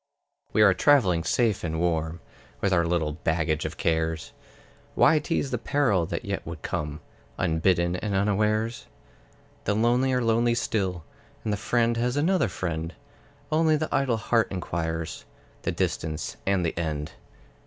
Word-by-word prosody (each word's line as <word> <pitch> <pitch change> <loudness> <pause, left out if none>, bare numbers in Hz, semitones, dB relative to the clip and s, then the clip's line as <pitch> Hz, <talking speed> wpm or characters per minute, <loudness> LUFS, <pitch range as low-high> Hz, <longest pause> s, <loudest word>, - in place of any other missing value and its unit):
We 110 - +4
are 100 -2 +7
travelling 90 - +4
safe 110 -2 +1
and 80 -1 -2
warm, 80 -1 -1 0.4
With 100 -1 +1
our 85 -2 +3
little 85 -3 0
baggage 80 0 -1
of - - -5
cares; 80 0 -1 0.6
Why 155 - +5
tease 150 -4 -1
the 125 - -1
peril 115 - +1
that - - -4
yet - - -3
would - - -8
come 75 0 -3 0.4
Unbidden 85 +2 +2
and 100 +1 -2
unawares? 105 +3 0 0.8
The 105 - +1
lonely 120 +4 +2
are 125 -1 +1
lonely 115 +1 +2
still; 95 -7 -1 0.4
And 105 - -1
the - - +2
friend 115 +2 +1
has 120 +3 0
another 170 -2 +2
friend; 85 -2 -4 0.6
Only 155 0 +4
the 155 +1 -3
idle 130 -4 +2
heart 115 0 +2
inquires 80 -3 -3 0.4
The - - -1
distance 80 -1 -2
and 95 -3 +2
the 80 - -1
end. 75 -3 -3
95 Hz, 150 wpm, -26 LUFS, 80-120 Hz, 0.8 s, are